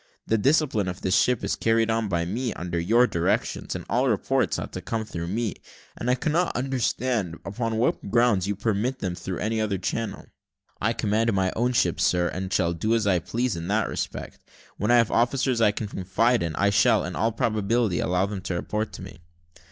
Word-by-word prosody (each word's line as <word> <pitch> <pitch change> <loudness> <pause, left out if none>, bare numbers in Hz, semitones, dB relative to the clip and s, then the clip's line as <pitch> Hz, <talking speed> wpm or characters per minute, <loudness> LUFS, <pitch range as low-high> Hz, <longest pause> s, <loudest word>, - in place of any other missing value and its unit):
The 110 - +1
discipline 135 -6 +2
of 90 0 -5
this 95 0 +1
ship 125 -2 +2
is - - 0
carried 115 0 +2
on 110 -1 0
by 85 -3 0
me, 115 +6 -2
under 85 -1 -3
your 115 +9 +4
directions, 85 -8 -1
and - - -6
all - - +1
reports - - +1
ought - - -6
to - - -5
come 110 -1 -3
through 85 -5 -5
me; 110 +2 -2 0.4
and 120 - -3
I 125 - +4
cannot 160 +7 0
understand 125 -7 -1
upon 110 +3 -2
what 115 -3 0
grounds 115 -4 +3
you 100 - -1
permit 110 +5 -1
them 95 -7 -3
through 90 +1 -5
any 110 +1 -1
other 105 -3 0
channel." 110 +5 -3 0.6
"I 115 +3 +2
command 110 +1 +1
my 95 -1 +1
own 125 +2 +1
ship, - - +1
sir, 90 -1 +2
and 95 +2 -5
shall 85 -4 +1
do 110 +7 0
as 115 -2 0
I 95 -3 +3
please 120 +5 -2
in 85 0 -5
that 105 +2 +1
respect. - - -5 0.4
When 105 - -1
I 120 - +6
have 115 -2 +3
officers 120 0 +1
I 110 - +6
can 105 - -4
confide 115 +6 +1
in, 85 -2 -2
I 100 0 +2
shall, 100 - +4
in - - -5
all 115 +2 +1
probability, 110 -2 0
allow 90 +2 +1
them 100 -1 -5
to 95 -1 -3
report 105 +5 -3
to - - -8
me." - - -11
110 Hz, 210 wpm, -25 LUFS, 95-120 Hz, 0.6 s, I